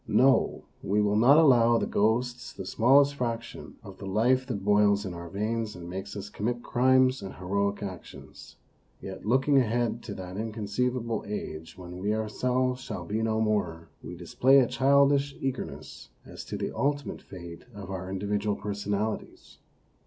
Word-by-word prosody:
No, 135 Hz, +1 st, +3 dB, 0.2 s
we 100 Hz, +2 st, 0 dB
will 105 Hz, 0 st, +2 dB
not 125 Hz, +7 st, +6 dB
allow 120 Hz, -7 st, +5 dB
the -, -, 0 dB
ghosts 120 Hz, +4 st, 0 dB
the 95 Hz, -, -7 dB
smallest 135 Hz, +8 st, +4 dB
fraction 120 Hz, -3 st, -5 dB
of 100 Hz, -3 st, -11 dB
the 95 Hz, -, -7 dB
life 125 Hz, +6 st, +2 dB
that 100 Hz, -6 st, -4 dB
boils 105 Hz, 0 st, +3 dB
in 95 Hz, -, -5 dB
our 85 Hz, 0 st, -8 dB
veins 110 Hz, +3 st, -2 dB
and 85 Hz, -1 st, -9 dB
makes 95 Hz, +3 st, -6 dB
us 100 Hz, 0 st, -6 dB
commit 120 Hz, +4 st, -3 dB
crimes 130 Hz, +1 st, +3 dB
and 95 Hz, -, -7 dB
heroic 100 Hz, +2 st, -1 dB
actions. 95 Hz, -4 st, -10 dB, 0.4 s
Yet 95 Hz, +1 st, -8 dB
looking 135 Hz, +4 st, +4 dB
ahead 120 Hz, -1 st, 0 dB
to 105 Hz, -4 st, -6 dB
that 90 Hz, 0 st, -7 dB
inconceivable 115 Hz, +2 st, -2 dB
age 80 Hz, -6 st, -6 dB
when 90 Hz, -1 st, -9 dB
we, 105 Hz, +3 st, 0 dB
ourselves, 125 Hz, +4 st, -1 dB
shall 90 Hz, -8 st, -6 dB
be 105 Hz, +5 st, -2 dB
no 110 Hz, 0 st, 0 dB
more, 90 Hz, -7 st, -1 dB
we 90 Hz, -, -8 dB
display 120 Hz, +10 st, +3 dB
a 130 Hz, -, +6 dB
childish 140 Hz, +2 st, +3 dB
eagerness 135 Hz, -1 st, -5 dB, 0.2 s
as -, -, -9 dB
to -, -, -5 dB
the -, -, -4 dB
ultimate 145 Hz, 0 st, -1 dB
fate 85 Hz, -2 st, -10 dB
of 95 Hz, -2 st, -8 dB
our 95 Hz, -1 st, -5 dB
individual 100 Hz, +2 st, -1 dB
per 105 Hz, 0 st, -4 dB
sonalities. 105 Hz, +1 st, -4 dB
110 Hz, 165 wpm, -28 LUFS, 100-125 Hz, 0.4 s, not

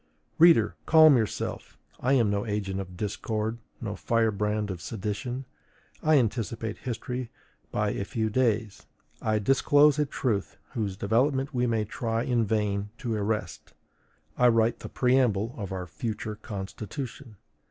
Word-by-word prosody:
Reader, 160 Hz, -10 st, +6 dB
calm 155 Hz, -2 st, +8 dB
yourself: 110 Hz, -5 st, -2 dB, 0.2 s
I 130 Hz, +2 st, +2 dB
am 115 Hz, -6 st, +3 dB
no 100 Hz, 0 st, 0 dB
agent 105 Hz, -3 st, -2 dB
of 90 Hz, -2 st, -7 dB
discord, 110 Hz, +2 st, -2 dB, 0.2 s
no 105 Hz, -4 st, -4 dB
firebrand 105 Hz, -2 st, 0 dB
of 90 Hz, -2 st, -6 dB
sedition. 115 Hz, +6 st, -4 dB, 0.6 s
I 155 Hz, -1 st, +4 dB
anticipate 115 Hz, -2 st, -1 dB
history 125 Hz, 0 st, -4 dB, 0.4 s
by 105 Hz, -1 st, 0 dB
a 100 Hz, -, -2 dB
few 110 Hz, +2 st, -2 dB
days; 110 Hz, -3 st, 0 dB, 0.3 s
I 110 Hz, -1 st, +1 dB
disclose 145 Hz, +6 st, +4 dB
a 150 Hz, -, +2 dB
truth 110 Hz, -8 st, -2 dB
whose 100 Hz, -5 st, -3 dB
development 130 Hz, +7 st, +1 dB
we 125 Hz, -1 st, +1 dB
may 110 Hz, -2 st, +1 dB
try 115 Hz, +1 st, -2 dB
in 120 Hz, -3 st, +1 dB
vain 105 Hz, -1 st, 0 dB
to 120 Hz, -4 st, -3 dB
arrest; 100 Hz, -7 st, -3 dB, 0.6 s
I 125 Hz, -, +6 dB
write 115 Hz, -1 st, +3 dB
the -, -, -8 dB
preamble 125 Hz, -4 st, +2 dB
of 100 Hz, -5 st, -6 dB
our 95 Hz, -1 st, -3 dB
future 110 Hz, +4 st, -4 dB
constitution. 110 Hz, +4 st, -7 dB
110 Hz, 140 wpm, -27 LUFS, 105-125 Hz, 0.6 s, calm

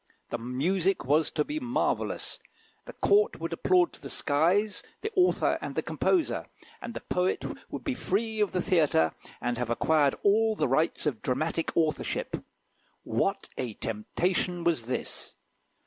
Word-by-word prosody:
The 120 Hz, -, -2 dB
music 170 Hz, +11 st, 0 dB
was 150 Hz, +4 st, +3 dB
to 150 Hz, -, 0 dB
be 310 Hz, -, -3 dB
marvellous, 245 Hz, -3 st, -1 dB, 0.5 s
the -, -, -9 dB
Court 425 Hz, +3 st, +3 dB
would -, -, -3 dB
applaud 360 Hz, -2 st, +3 dB
to -, -, -13 dB
the -, -, -7 dB
skies 175 Hz, +9 st, +2 dB, 0.2 s
the 435 Hz, -, -3 dB
author 365 Hz, -1 st, +3 dB
and -, -, -5 dB
the -, -, 0 dB
composer, 350 Hz, -4 st, +1 dB, 0.3 s
and 235 Hz, -1 st, -6 dB
the -, -, -4 dB
poet 180 Hz, +1 st, 0 dB, 0.2 s
would -, -, -6 dB
be 275 Hz, -, -1 dB
free 220 Hz, -1 st, -1 dB
of 210 Hz, -2 st, +2 dB
the 180 Hz, -, 0 dB
theatre, 145 Hz, -, +3 dB, 0.3 s
and 120 Hz, -1 st, -2 dB
have 125 Hz, -2 st, -2 dB
acquired 145 Hz, +3 st, +3 dB
all 220 Hz, +2 st, +4 dB
the -, -, +1 dB
rights 155 Hz, +7 st, +1 dB
of 135 Hz, -8 st, -1 dB
dramatic 160 Hz, +5 st, -1 dB
authorship. 155 Hz, -2 st, 0 dB, 0.6 s
What -, -, -1 dB
a 120 Hz, -5 st, -3 dB
temptation 175 Hz, -, -1 dB
was 160 Hz, -9 st, +1 dB
this! 125 Hz, -, -4 dB
170 Hz, 155 wpm, -28 LUFS, 135-215 Hz, 0.6 s, all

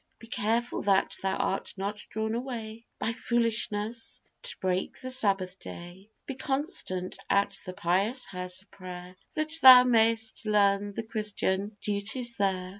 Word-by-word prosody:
Be -, -, -13 dB
careful 230 Hz, +1 st, -1 dB
that 195 Hz, -1 st, +2 dB
thou 190 Hz, 0 st, 0 dB
art 195 Hz, -, -2 dB
not 200 Hz, +2 st, -3 dB
drawn 220 Hz, 0 st, -2 dB
away, 230 Hz, -2 st, -5 dB
By 230 Hz, -, -1 dB
foolishness, 230 Hz, -1 st, 0 dB, 0.2 s
to -, -, -7 dB
break 185 Hz, 0 st, -2 dB
the 255 Hz, 0 st, -6 dB
Sabbath 195 Hz, -7 st, +2 dB
day; 175 Hz, +4 st, -10 dB, 0.2 s
Be 270 Hz, -, -4 dB
constant 270 Hz, -, -3 dB
at 200 Hz, 0 st, +2 dB
the 185 Hz, -, -5 dB
pious 195 Hz, +9 st, +1 dB
house 180 Hz, 0 st, -4 dB
of -, -, -37 dB
prayer, 180 Hz, -1 st, -9 dB, 0.2 s
That 310 Hz, 0 st, -2 dB
thou 255 Hz, -1 st, +11 dB
mayst 225 Hz, -2 st, +2 dB
learn 205 Hz, -1 st, +2 dB
the 225 Hz, -, -3 dB
christian 210 Hz, -2 st, -2 dB
duties 220 Hz, +4 st, -2 dB
there. 190 Hz, -2 st, 0 dB
210 Hz, 145 wpm, -28 LUFS, 190-235 Hz, 0.2 s, thou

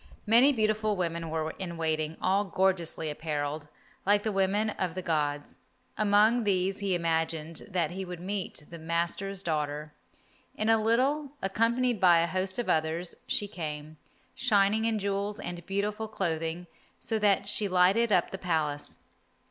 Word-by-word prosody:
Many 235 Hz, +6 st, +6 dB
beautiful 215 Hz, -3 st, +1 dB
women 170 Hz, -2 st, -2 dB
were 160 Hz, 0 st, -2 dB
in 175 Hz, -3 st, -5 dB
waiting, 155 Hz, -1 st, -1 dB
all 195 Hz, +2 st, +3 dB
gorgeously 175 Hz, -4 st, 0 dB
apparelled, 150 Hz, -1 st, -3 dB, 0.4 s
like 205 Hz, +1 st, +3 dB
the 220 Hz, -, 0 dB
women 200 Hz, +2 st, +1 dB
of 180 Hz, -4 st, -3 dB
the 185 Hz, -, -4 dB
gods. 145 Hz, -3 st, -1 dB, 0.4 s
Among 215 Hz, +3 st, +4 dB
these 195 Hz, -1 st, +1 dB
he 195 Hz, -3 st, 0 dB
imagined 165 Hz, -1 st, -1 dB
that 175 Hz, -5 st, 0 dB
he 190 Hz, +2 st, -4 dB
would 180 Hz, -2 st, -7 dB
meet 190 Hz, -3 st, -4 dB
the 170 Hz, -, -8 dB
master's 170 Hz, +4 st, -2 dB
daughter. 150 Hz, -2 st, -2 dB, 0.6 s
In 215 Hz, -, -1 dB
a 225 Hz, -1 st, +4 dB
little, 270 Hz, +6 st, +1 dB
accompanied 230 Hz, +3 st, +1 dB
by 175 Hz, -3 st, +6 dB
a -, -, +2 dB
host 185 Hz, +2 st, -2 dB
of 240 Hz, -, -2 dB
others, 160 Hz, +2 st, 0 dB
she 205 Hz, -, 0 dB
came, 155 Hz, -4 st, -6 dB, 0.4 s
shining 215 Hz, -2 st, +2 dB
in 225 Hz, -1 st, +1 dB
jewels 200 Hz, +1 st, -2 dB
and 175 Hz, 0 st, -6 dB
beautiful 210 Hz, +3 st, -2 dB
clothing 165 Hz, -4 st, -2 dB, 0.3 s
so 220 Hz, -1 st, -1 dB
that 200 Hz, -1 st, +2 dB
she 210 Hz, 0 st, +1 dB
lighted 190 Hz, +5 st, +3 dB
up -, -, +3 dB
the 195 Hz, -, -5 dB
Palace. 155 Hz, -5 st, -2 dB
185 Hz, 155 wpm, -29 LUFS, 165-210 Hz, 0.6 s, Many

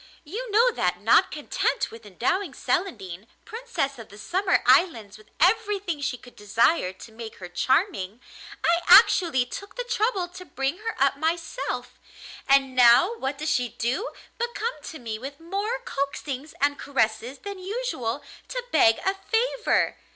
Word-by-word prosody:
You 440 Hz, +11 st, -6 dB
know 460 Hz, +4 st, +4 dB
that, -, -, -1 dB
not -, -, +4 dB
content -, -, -1 dB
with 225 Hz, -2 st, -12 dB
endowing 255 Hz, -, -1 dB
Celandine, 220 Hz, -, -3 dB, 0.2 s
Princess 450 Hz, -, -3 dB
of 230 Hz, -, -10 dB
the 205 Hz, -, -13 dB
Summer 370 Hz, -, +1 dB
Islands, 225 Hz, -, +3 dB
with 215 Hz, -, -17 dB
everything 390 Hz, -3 st, +1 dB
she 265 Hz, -2 st, -2 dB
could 245 Hz, 0 st, -16 dB
desire 210 Hz, -, +2 dB
to 190 Hz, +4 st, -13 dB
make 225 Hz, 0 st, -9 dB
her 180 Hz, -, -9 dB
charming, 240 Hz, -, 0 dB, 0.5 s
I 340 Hz, +1 st, +3 dB
actually 295 Hz, -9 st, +6 dB
took 400 Hz, +10 st, -9 dB
the -, -, -3 dB
trouble 460 Hz, -6 st, 0 dB
to 365 Hz, +1 st, -10 dB
bring 270 Hz, +1 st, -3 dB
her 450 Hz, +1 st, -4 dB
up 275 Hz, +1 st, +2 dB
myself; 330 Hz, +8 st, -3 dB, 0.5 s
and 270 Hz, -1 st, +4 dB
now 250 Hz, -, +6 dB
what 270 Hz, +1 st, -3 dB
does 305 Hz, +2 st, -2 dB
she 245 Hz, -1 st, +1 dB
do 265 Hz, -, -2 dB, 0.3 s
but 475 Hz, 0 st, -2 dB
come 470 Hz, +3 st, -2 dB
to 320 Hz, -, -7 dB
me 225 Hz, -4 st, -5 dB
with 275 Hz, +4 st, -8 dB
more 400 Hz, +8 st, -2 dB
coaxings 280 Hz, -, -4 dB
and 285 Hz, 0 st, +1 dB
caresses 235 Hz, -1 st, -1 dB
than 400 Hz, -1 st, -8 dB
usual 365 Hz, -, -3 dB, 0.2 s
to -, -, -4 dB
beg 225 Hz, -, +5 dB
a 385 Hz, -, +2 dB
favour. 455 Hz, +5 st, 0 dB
300 Hz, 160 wpm, -25 LUFS, 245-400 Hz, 0.5 s, actually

